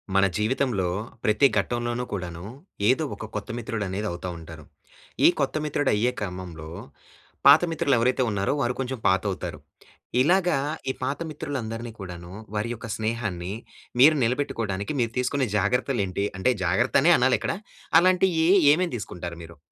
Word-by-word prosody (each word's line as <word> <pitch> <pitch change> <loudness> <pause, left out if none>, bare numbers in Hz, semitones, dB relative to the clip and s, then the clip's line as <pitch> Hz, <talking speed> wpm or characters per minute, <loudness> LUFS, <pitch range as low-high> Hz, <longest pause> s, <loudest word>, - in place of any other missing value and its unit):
మన 95 - +5
జీవితంలో 110 -3 0 0.4
ప్రతి 110 +6 +4
ఘట్టంలోనూ 120 +3 -1
కూడాను 90 -2 -5 0.4
ఏదో 130 +5 +3
ఒక 110 - -7
కొత్త 105 - -4
మిత్రుడనేది 105 -3 -3
అవుతా 85 +1 -5
ఉంటారు. 80 -1 -11 0.6
ఈ - - +10
కొత్త 140 0 0
మిత్రుడయ్యే 130 -6 +1
క్రమంలో 90 -5 -6 0.8
పాత 140 +3 +9
మిత్రులు 160 -4 +2
ఎవరైతే 125 +3 +2
ఉన్నారో, 100 +3 0
వారు 120 -1 +1
కొంచెం 130 0 -2
పాతవుతారు. 95 +1 -1 0.6
ఇలాగ 180 +5 +3 0.4
ఈ - - -6
పాత 135 +3 -2
మిత్రులందరినీ 120 -6 -5
కూడాను 90 -2 -8 0.2
వారి 105 +3 -1
యొక్క 115 0 -8
స్నేహాన్ని 105 -5 -3 0.5
మీరు 155 +4 +8
నిలబెట్టుకోవడానికి 115 -4 -1
మీరు 115 -1 0
తీసుకునే 125 +1 0
జాగ్రత్తలేంటి? 105 -2 0
అంటే 130 - +3
జాగ్రత్తనే 125 - +3
అనాలిక్కడ. 125 +1 +2 0.5
అలాంటియి 180 -2 +3 0.3
ఏమేమి 175 +2 0
తీసుకుంటారు 90 -5 -6
మీరు? 85 0 -12
115 Hz, 130 wpm, -25 LUFS, 95-135 Hz, 0.8 s, ఈ